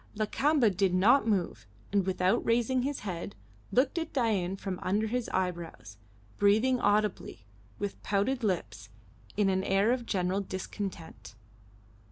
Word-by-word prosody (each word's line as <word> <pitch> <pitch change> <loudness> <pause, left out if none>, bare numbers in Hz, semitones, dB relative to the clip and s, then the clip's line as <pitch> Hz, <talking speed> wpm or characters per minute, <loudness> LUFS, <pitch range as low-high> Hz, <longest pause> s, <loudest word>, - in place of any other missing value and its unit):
Lakamba 235 +3 +2
did 190 -1 +1
not 225 +6 +4
move, 190 - -1 0.3
and, 195 -2 +2
without 190 +4 +1
raising 240 +2 +1
his 280 +2 -3
head, 180 - -5 0.4
looked 265 +6 +2
at 325 -1 -5
Dain 205 -8 0
from 190 -1 -5
under 205 +4 0
his 240 +2 -2
eyebrows, 170 - -4 0.4
breathing 220 +6 +3
audibly, 205 - 0 0.3
with 205 -1 -5
pouted 210 +6 0
lips, 110 - -2 0.5
in 205 -2 +3
an 190 0 +1
air 195 +4 +2
of 245 -2 -2
general 185 0 0
discontent. 190 - -7
200 Hz, 135 wpm, -29 LUFS, 185-235 Hz, 0.5 s, not